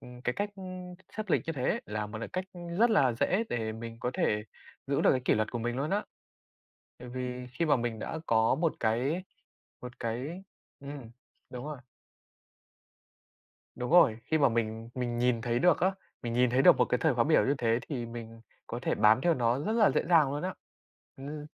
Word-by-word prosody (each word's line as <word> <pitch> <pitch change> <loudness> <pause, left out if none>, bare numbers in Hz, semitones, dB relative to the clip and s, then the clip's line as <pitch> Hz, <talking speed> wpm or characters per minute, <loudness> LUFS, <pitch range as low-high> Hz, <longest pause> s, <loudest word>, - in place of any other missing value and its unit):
ừm, 125 0 -12
cái 125 - 0
cách 205 +9 -2
ưm, 185 -1 -8 0.2
sắp 215 -2 -4
lịch - - +2
như 165 - -1
thế 130 -3 -1
là 105 0 -3
một 110 +1 -7
cái - - -4
cách, 185 0 -3
ưm, 175 -1 -7
rất 235 +1 +5
là 135 - +4
dễ 185 - +1
để 110 -2 -2
mình 115 +1 -7
có 125 - -1
thể 105 0 0 0.4
giữ 140 0 +1
được - - +5
cái 130 - +2
kỷ - - +4
luật 110 0 0
của 120 - -2
mình 120 +1 -2
luôn 145 +4 -2
á, 205 +2 0 0.9
tại 125 - -10
vì 125 0 -5
khi 165 - -1
mà 150 -4 +4
mình 115 -2 -3
đã 160 - -4
có 115 +2 +3
một 160 +2 +1
cái 125 +10 0 0.6
một 125 0 -10
cái 130 +11 -4 0.4
ừm, 140 -4 -8 0.4
đúng 125 +1 -7
rồi. 150 -2 -5 2.0
Đúng 125 0 -4
rồi, 150 -11 +6
khi 160 +3 +1
mà 140 -3 +5
mình 115 0 -2
mình 120 -2 -2
nhìn 120 -1 +2
thấy 120 0 0
được 175 +5 +4
á, 190 +2 +3 0.3
mình 120 -1 -3
nhìn 125 0 +3
thấy 130 +2 +3
được - - +8
một - - +4
cái 125 - 0
thời 160 -5 +2
khóa 120 -1 +3
biểu 155 - +4
như 140 - +2
thế 115 -1 +2
thì 125 -6 -3
mình 115 -1 -9 0.3
có 120 - -4
thể - - +1
bám 110 +3 +5
theo 170 +2 +3
nó 120 -1 +1
rất 155 +10 -2
là 225 -2 +5
dễ - - +1
dàng 160 -6 +5
luôn 145 - -3
á, 185 +1 -3 0.6
ừm. 145 +2 -7
125 Hz, 215 wpm, -30 LUFS, 115-160 Hz, 2.0 s, được